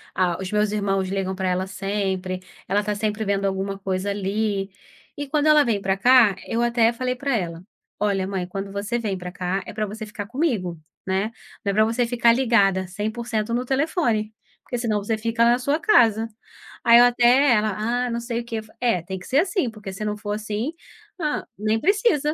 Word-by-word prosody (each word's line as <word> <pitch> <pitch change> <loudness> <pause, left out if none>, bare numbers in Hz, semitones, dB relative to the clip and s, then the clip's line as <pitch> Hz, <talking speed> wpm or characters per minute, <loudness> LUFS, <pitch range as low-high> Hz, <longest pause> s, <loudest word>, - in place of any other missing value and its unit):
ah, 180 -2 +1
os 190 - -4
meus 210 0 +1
irmãos 195 -2 0
ligam 190 -1 -2
pra 190 -1 -1
ela 185 +1 -1
sempre, 190 -2 -2 0.3
ela 205 +2 +1
tá 210 0 -2
sempre 215 +1 -1
vendo 200 0 0
alguma 195 0 -2
coisa 190 0 -2
ali. 200 0 -1 0.5
E 290 0 -4
quando 295 +2 +1
ela 300 -1 +6
vem 215 -5 0
pra 190 0 0
cá 235 -1 +6
eu 230 - -1
até 235 -1 +3
falei 250 +1 -2
pra 275 +1 -1
ela: 170 -4 -3 0.4
"Olha, 200 -2 +1
mãe, 190 -2 -3
quando 195 +1 -5
você 205 +4 -2
vem 205 -4 -2
pra 180 0 -7
cá 185 +2 -2
é - - -8
pra 215 0 -1
você 215 +2 -7
ficar 210 -1 -6
comigo, 225 - -1 0.3
né, 190 +4 0 0.3
não 200 - +2
é - - -3
pra 215 +2 +4
você 230 +2 +1
ficar 235 -1 +4
ligada 200 -7 +2
100% 220 +3 -3
no 245 +2 0
telefone, 260 - 0 0.3
porque 245 - -4
senão 215 -4 -1
você 220 +2 -1
fica 230 +1 0
na 240 +1 +4
sua 280 +4 +1
casa". 230 - +4 0.6
Aí 235 0 +8
ela 245 - +8
até 245 +3 +4
ela: 215 -3 +2 0.3
"Ah, - - -3
não 235 0 -2
sei 235 0 -3
o 235 - -6
que". 230 -1 -3 0.2
É, 230 -8 +1
tem 190 +3 -6
que 180 - -12
ser 270 - +3
assim, 365 - +1
porque 215 -3 -8
se 195 +3 -5
não 210 0 -1
for 205 0 -6
assim, 215 +5 -2 0.5
ah, 300 -3 -1 0.2
nem 215 +1 +1
precisa. 380 - +2
215 Hz, 205 wpm, -23 LUFS, 195-240 Hz, 0.6 s, Aí